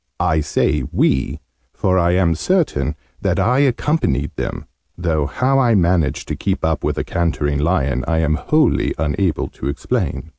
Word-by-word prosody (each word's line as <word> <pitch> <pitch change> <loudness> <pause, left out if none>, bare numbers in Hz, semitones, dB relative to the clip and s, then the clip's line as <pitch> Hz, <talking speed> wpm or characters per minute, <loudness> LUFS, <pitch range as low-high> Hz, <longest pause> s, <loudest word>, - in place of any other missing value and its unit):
I 80 - +2
say 75 -1 0
'we,' 65 -1 +1 0.4
for 95 0 +1
I 85 0 +2
am 90 -2 +3
certain 80 - 0 0.3
that - - 0
I 125 +3 +2
accompanied 140 - +1
them - - -4 0.3
though 80 -4 0
how 130 - +1
I 120 -4 +3
managed 85 -4 +1
to - - -1
keep - - -2
up - - 0
with - - -1
a - - -1
cantering 75 -4 -1
lion 70 -5 0
I 80 - +1
am 80 -1 +2
wholly 155 - +1
unable 80 +2 0
to 65 - -7
explain. 70 -1 -2
85 Hz, 160 wpm, -19 LUFS, 75-100 Hz, 0.4 s, am